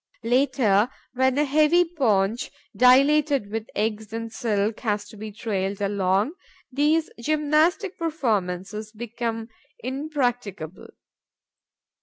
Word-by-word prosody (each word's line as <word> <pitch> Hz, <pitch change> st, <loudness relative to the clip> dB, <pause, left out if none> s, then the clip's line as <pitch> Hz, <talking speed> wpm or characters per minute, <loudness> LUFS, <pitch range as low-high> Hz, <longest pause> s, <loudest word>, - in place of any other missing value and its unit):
Later, 245 Hz, -3 st, +3 dB, 0.2 s
when 260 Hz, +1 st, +2 dB
a 295 Hz, -, +3 dB
heavy 310 Hz, +5 st, +4 dB
paunch, 230 Hz, -, 0 dB, 0.3 s
dilated 270 Hz, 0 st, +4 dB
with 225 Hz, 0 st, -3 dB
eggs 215 Hz, 0 st, -2 dB
and 225 Hz, 0 st, -5 dB
silk, 215 Hz, -2 st, -1 dB
has 210 Hz, -3 st, -2 dB
to -, -, -13 dB
be 215 Hz, +1 st, -7 dB
trailed 200 Hz, -2 st, -3 dB
along, 200 Hz, +3 st, +1 dB, 0.4 s
those 300 Hz, +4 st, +2 dB
gymnastic 310 Hz, -, +1 dB
performances 215 Hz, -, -2 dB
become 230 Hz, 0 st, -4 dB, 0.3 s
impracticable. 245 Hz, -, -3 dB
230 Hz, 100 wpm, -24 LUFS, 210-285 Hz, 0.4 s, heavy